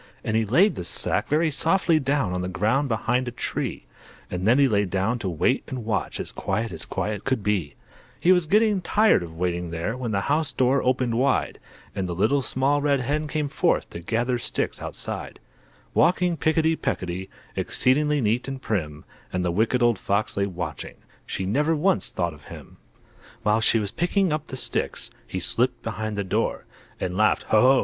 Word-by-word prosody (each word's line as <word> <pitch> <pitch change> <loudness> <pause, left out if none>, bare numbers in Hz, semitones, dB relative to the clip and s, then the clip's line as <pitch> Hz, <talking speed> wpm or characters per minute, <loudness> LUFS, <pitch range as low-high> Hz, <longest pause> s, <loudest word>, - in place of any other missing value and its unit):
And 110 - -1
he 110 0 +2
laid 170 - +4
the - - -5
sack 105 +5 -1
very 155 +2 +2
softly 165 +2 +3
down 135 -8 0
On 90 - -1
the 90 - -2
ground 110 +10 +1
behind 120 +3 0
a - - -2
tree, - - -4 0.5
And 90 +2 -2
then 120 +4 +5
lay 105 -4 +2
down 100 +5 -1
to 95 - -2
wait 90 - +1
and 130 -5 -5
watch, 110 -4 -2
As - - -4
quiet 110 +4 -2
as 80 - -2
quiet 105 -1 -3
could 130 -6 -1
be. 95 -8 -1 0.4
He 180 - +4
was 180 -3 +3
getting 210 +1 +3
tired 215 - +4
of 85 -2 -8
waiting 90 0 -2
there, 85 +7 -3
When 125 -2 -4
the 100 -2 0
house 150 +4 +1
door 130 +2 +2
opened 125 -2 +1
wide, 135 0 +1 0.3
And 95 -2 -3
the 85 - -3
Little 130 +10 +2
Small 135 +3 +1
Red 140 -2 +2
Hen 150 +4 -1
came 150 -1 -1
forth - - 0
To - - -6
gather 120 +7 -1
sticks - - -2
outside; - - -5 0.5
Walking 175 +1 +3
picketty 160 +1 +2
pecketty, 95 - -3 0.3
Exceedingly 150 +3 +2
neat 115 +3 0
and 135 -1 -4
prim; 75 - -3 0.3
And 90 0 -1
the 85 - +1
Wicked 115 +6 +1
Old 120 -4 +3
Fox 100 +2 0
lay 100 0 +1
watching; 85 -6 -6 0.3
She 95 - -3
never 150 +11 +1
once 180 +5 +1
thought 85 -2 -2
of 75 - -16
him! - - -11 0.7
While 105 +1 +2
she 110 - +4
was 105 -3 -1
picking 180 0 +1
up 155 0 -3
the 130 - -6
sticks - - -2 0.2
He 95 - -3
slipped 125 +7 +1
behind 110 -1 -4
the 100 - 0
door, 95 - -1 0.3
And 90 - -3
laughed 110 +2 +3
"Ho! 110 - +5
Ho!" 130 +1 +6
120 Hz, 190 wpm, -24 LUFS, 95-145 Hz, 0.7 s, Ho